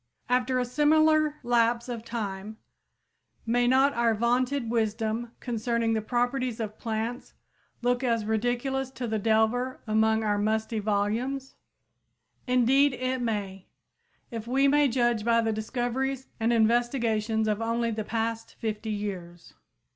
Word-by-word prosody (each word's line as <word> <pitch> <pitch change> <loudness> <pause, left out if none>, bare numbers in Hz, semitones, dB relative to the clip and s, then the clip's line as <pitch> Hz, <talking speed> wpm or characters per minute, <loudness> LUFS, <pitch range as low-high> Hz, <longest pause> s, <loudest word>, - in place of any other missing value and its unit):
After 250 +1 +2
a 250 - +1
similar 305 +3 +3
lapse 235 0 +2
of 235 -3 -5
time, 215 -2 -5 0.9
may 240 +1 +2
not 265 +3 +4
our 235 -2 +2
vaunted 245 +3 +1
wisdom 225 +1 -1
concerning 235 -1 -1
the 220 - 0
properties 245 +1 -1
of 215 -1 -5
plants 230 +2 -4 0.5
look 245 +1 +1
as 230 -3 +1
ridiculous 245 +4 -1
to 255 -1 -6
the 220 -2 -1
delver 225 +4 +1
among 220 0 +2
our 205 -1 +1
musty 220 +1 0
volumes? 220 +6 -1 0.9
Indeed, 255 +3 +4
it 255 +1 -2
may, 200 -5 -3 0.6
if 230 -1 -6
we 270 +3 +3
may 290 +1 +4
judge 240 -3 +1
by 230 0 +3
the 225 -1 +1
discoveries 250 +4 -2
and 225 +1 +1
investigations 225 -1 +1
of 210 +1 0
only 230 +1 0
the 215 -1 -3
past 225 +1 -3
fifty 220 0 -4
years. 185 -5 -5
235 Hz, 130 wpm, -27 LUFS, 220-250 Hz, 0.9 s, not